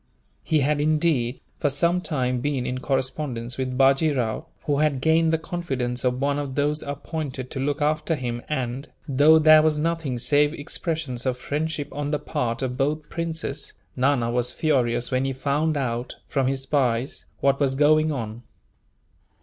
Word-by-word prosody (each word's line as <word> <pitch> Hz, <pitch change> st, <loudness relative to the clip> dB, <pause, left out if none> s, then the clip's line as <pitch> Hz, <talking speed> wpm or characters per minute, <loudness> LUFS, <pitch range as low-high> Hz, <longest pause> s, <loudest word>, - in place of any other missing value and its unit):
He 155 Hz, -2 st, +2 dB
had, 145 Hz, +1 st, +1 dB
indeed, 150 Hz, -5 st, +1 dB, 0.2 s
for 145 Hz, -, +2 dB
some 170 Hz, +6 st, +1 dB
time 125 Hz, -7 st, -1 dB
been 135 Hz, -2 st, -1 dB
in 130 Hz, 0 st, -2 dB
correspondence 130 Hz, -2 st, -2 dB
with 130 Hz, -1 st, -2 dB
Bajee 135 Hz, +4 st, +4 dB
Rao, 110 Hz, -3 st, -2 dB, 0.2 s
who 145 Hz, -1 st, +1 dB
had 150 Hz, -3 st, +2 dB
gained 160 Hz, +3 st, +3 dB
the 160 Hz, -, +3 dB
confidence 135 Hz, -8 st, -3 dB
of 125 Hz, 0 st, +1 dB
one 140 Hz, +1 st, +1 dB
of 140 Hz, -2 st, -4 dB
those 150 Hz, +1 st, +1 dB
appointed 140 Hz, -2 st, -5 dB
to 135 Hz, -, -4 dB
look 145 Hz, +2 st, 0 dB
after 155 Hz, +2 st, +1 dB
him 120 Hz, -3 st, -4 dB
and, 130 Hz, -1 st, -3 dB, 0.2 s
though 145 Hz, +3 st, +6 dB
there 155 Hz, 0 st, +7 dB
was 155 Hz, -1 st, +2 dB
nothing 160 Hz, -4 st, -1 dB
save 145 Hz, +5 st, +2 dB
expressions 145 Hz, -4 st, -3 dB
of 125 Hz, -1 st, 0 dB
friendship 150 Hz, +2 st, -3 dB
on 145 Hz, 0 st, -3 dB
the 150 Hz, -, +1 dB
part 120 Hz, -2 st, -2 dB
of 125 Hz, -1 st, -2 dB
both 150 Hz, +3 st, -1 dB
princes, 165 Hz, -4 st, -3 dB, 0.2 s
Nana 125 Hz, -3 st, +2 dB
was 125 Hz, 0 st, +1 dB
furious 125 Hz, -5 st, +1 dB
when 130 Hz, 0 st, +1 dB
he 135 Hz, 0 st, -1 dB
found 145 Hz, +4 st, 0 dB
out, 120 Hz, -2 st, -2 dB
from 135 Hz, -2 st, 0 dB
his 135 Hz, 0 st, 0 dB
spies, 130 Hz, -2 st, 0 dB
what 140 Hz, 0 st, +2 dB
was 135 Hz, -2 st, +2 dB
going 155 Hz, +2 st, +4 dB
on. 115 Hz, -4 st, -4 dB
140 Hz, 170 wpm, -24 LUFS, 125-155 Hz, 0.2 s, there